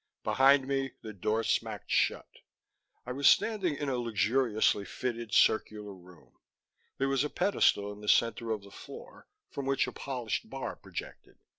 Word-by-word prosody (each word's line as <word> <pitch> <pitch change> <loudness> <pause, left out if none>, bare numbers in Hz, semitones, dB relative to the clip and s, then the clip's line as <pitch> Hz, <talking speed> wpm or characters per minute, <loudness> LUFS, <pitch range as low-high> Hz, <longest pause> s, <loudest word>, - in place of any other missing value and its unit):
Behind 135 0 +4
me, 135 -1 -1
the 110 - -7
door 105 +4 -1
smacked - - -2
shut. - - +1 0.8
I 125 - -5
was 140 +2 +4
standing 195 -8 +2
in 145 0 -4
a 130 -2 0
luxuriously 115 -1 +1
fitted 120 +1 -4
circular 105 -2 +2
room. 90 -2 -18 0.6
There 135 - 0
was 135 0 +1
a 150 - -2
pedestal 145 - +2
in 105 - -13
the 105 - -3
center 115 0 +2
of 110 -2 -2
the 100 - -14
floor, - - -12 0.2
from 140 -1 -5
which 135 0 +2
a - - -5
polished 125 -5 -4
bar - - -5
projected. - - -9
120 Hz, 160 wpm, -30 LUFS, 105-135 Hz, 0.8 s, Behind